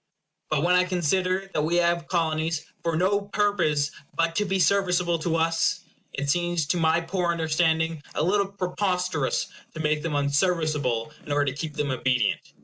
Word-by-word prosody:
But 155 -1 +1
when 180 +1 +3
I 180 0 +5
consider 185 +2 0
that 150 - +1
we 160 +3 0
have 170 -1 +2
Colonies 160 -2 0 0.2
for 165 -1 -1
no 195 +4 +2
purpose 195 -8 +1 0.2
but 165 0 +1
to 210 - +2
be 195 0 0
serviceable 180 -3 +2
to 165 +1 -1
us, 165 +2 +1 0.3
it 140 0 -4
seems 175 +1 +1
to 180 - +2
my 165 0 +3
poor 175 0 -1
understanding 160 -1 +1
a 150 - +1
little 200 +3 +2
preposterous 180 -5 -1 0.3
to - - -6
make 150 -1 +1
them 160 -2 -2
unserviceable 145 -4 0
in - - -8
order 145 -1 +2
to - - -10
keep 150 0 -5
them 145 -2 -1
obedient. 125 -4 +1
165 Hz, 170 wpm, -25 LUFS, 150-180 Hz, 0.3 s, I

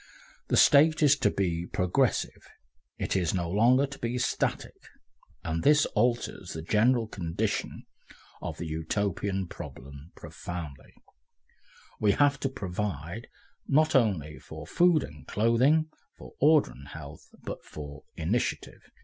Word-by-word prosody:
The - - +1
State 155 +2 +6
is 145 -1 +6
to 105 - +2
be 85 -4 -1
progressive, 90 -1 0 0.5
it - - -2
is 90 -1 +1
no 85 -2 -1
longer 120 +9 +4
to 140 0 -10
be 120 +1 -2
static, 125 - -1 0.7
and 80 +1 -2
this 150 +1 +5
alters 120 +2 0
the 80 - -6
general 115 +6 +3
condition 85 -6 -3 0.6
of - - -5
the 85 - -5
Utopian 95 +4 -2
problem 70 -2 -10
profoundly; 80 -6 -8 1.0
we 105 -2 +3
have 145 +2 +3
to 135 - -1
provide 95 - -4 0.4
not 155 +3 +3
only 95 - +1
for 80 -1 -10
food 170 - +3
and 75 -1 -11
clothing, 125 +9 +3 0.3
for - - -12
order 150 +1 +5
and 70 +2 -13
health, 75 0 -10 0.2
but - - -6
for 75 -1 -9
initiative. 95 +10 -2
100 Hz, 130 wpm, -28 LUFS, 80-130 Hz, 1.0 s, State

